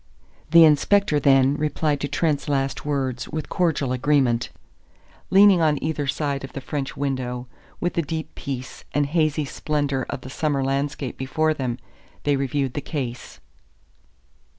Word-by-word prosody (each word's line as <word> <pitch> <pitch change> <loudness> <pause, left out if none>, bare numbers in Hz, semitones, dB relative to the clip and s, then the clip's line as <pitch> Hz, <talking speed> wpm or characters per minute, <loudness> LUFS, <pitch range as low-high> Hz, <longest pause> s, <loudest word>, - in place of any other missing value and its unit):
The 165 0 +8
inspector, 155 +2 +3
then, 135 0 +4
replied 150 -1 0
to 145 - -1
Trent's 145 +1 0
last 135 0 -1
words 130 -4 -2
with 155 -1 -4
cordial 160 -7 0
agreement. 130 -2 +2 0.8
Leaning 195 -2 +6
on 155 -2 +3
either 150 -2 -2
side 140 0 -1
of 135 - -8
the - - -4
French 135 0 -4
window, 130 -3 -2 0.3
with 175 - -1
the 170 - +1
deep 160 +1 -5
peace 130 -2 -6
and 145 0 +2
hazy 155 0 +1
splendor 140 -2 -2
of - - -4
the 130 - -9
summer 145 -2 0
landscape 140 0 -2
before 155 +4 +1
them, 130 -5 -3 0.5
they 145 -1 +2
reviewed 135 -1 -1
the 145 - -3
case. 130 -4 -5
145 Hz, 150 wpm, -23 LUFS, 135-155 Hz, 0.8 s, The